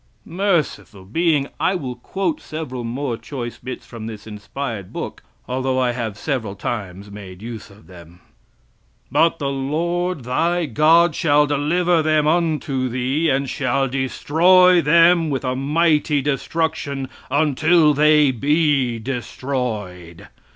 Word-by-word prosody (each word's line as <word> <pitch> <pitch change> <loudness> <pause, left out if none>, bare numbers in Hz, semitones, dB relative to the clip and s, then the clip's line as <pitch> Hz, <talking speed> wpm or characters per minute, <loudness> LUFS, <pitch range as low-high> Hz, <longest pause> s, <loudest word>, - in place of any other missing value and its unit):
Merciful 170 - -2
Being! 150 - +1
I 190 - +1
will 130 -8 -4
quote 195 - -3
several 130 -6 -6
more 120 +1 -3
choice 120 -3 -7
bits 130 - -7
from 115 -2 -8
this 110 -2 -8
inspired 105 0 -6
book, - - -6 0.3
although 130 +1 -1
I 125 -1 +2
have 115 -4 -4
several 115 -7 -3
times 100 -2 -5
made 95 -1 -10
use 115 -2 -8
of 100 -4 -18
them. 85 0 -15 0.9
"But 165 0 +3
the 140 -3 -2
Lord 165 +4 -2
thy 165 +8 0
God 160 +5 +4
shall 150 -1 +3
deliver 160 +4 +1
them 155 -1 +2
unto 155 -5 0
thee, 130 +6 0
and 135 0 0
shall 135 +1 0
destroy 170 +7 +4
them 165 +1 +4
with 135 -2 -2
a 125 0 -1
mighty 150 +1 +1
destruction, 145 -1 -2 0.2
until 155 +3 +3
they 150 -1 +4
be 140 -2 +1
destroyed. 110 -8 -5
140 Hz, 130 wpm, -20 LUFS, 120-160 Hz, 0.9 s, God